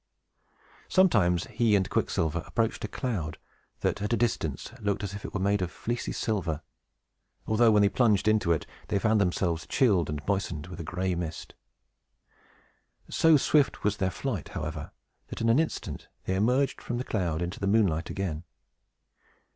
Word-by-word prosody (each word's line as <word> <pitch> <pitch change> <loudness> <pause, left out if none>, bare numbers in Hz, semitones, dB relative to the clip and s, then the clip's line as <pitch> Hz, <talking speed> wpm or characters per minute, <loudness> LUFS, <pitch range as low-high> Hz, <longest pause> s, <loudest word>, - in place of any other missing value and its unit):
Sometimes 105 - +4
he 110 -1 +2
and 95 -2 +2
Quicksilver 80 +1 0
approached 115 -1 -1
a - - -1
cloud 100 - -3 0.4
that, - - 0
at 105 - -2
a - - +3
distance, 90 - -1
looked 105 -1 -1
as 100 -1 -4
if 100 - -7
it - - -5
were 105 - -3
made 100 +1 +1
of 90 - -1
fleecy 120 +6 -3
silver; 85 -8 -2 0.8
although, 115 +2 +4
when 105 -1 +5
they - - +6
plunged 105 -3 +2
into 105 -5 +3
it, 80 - +1 0.2
they - - +1
found 110 +1 +2
themselves 90 -3 0
chilled 95 - +3
and 75 -1 -4
moistened 95 -6 -1
with 90 -1 -7
gray 90 +3 -1
mist. 85 -2 -5 1.6
So 160 -2 +5
swift 145 +1 +2
was 105 0 +1
their 95 -2 +1
flight, 105 - -3
however, 80 -1 -5 0.4
that, - - -7
in 115 - +1
an 115 +5 +5
instant, 160 - -3 0.2
they 95 - 0
emerged 125 +8 +1
from 120 - -3
the 125 - -2
cloud 90 -10 -1
into 90 +2 -5
the 100 - -1
moonlight 95 -6 +2
again. 90 -5 -3
100 Hz, 165 wpm, -28 LUFS, 85-115 Hz, 1.6 s, they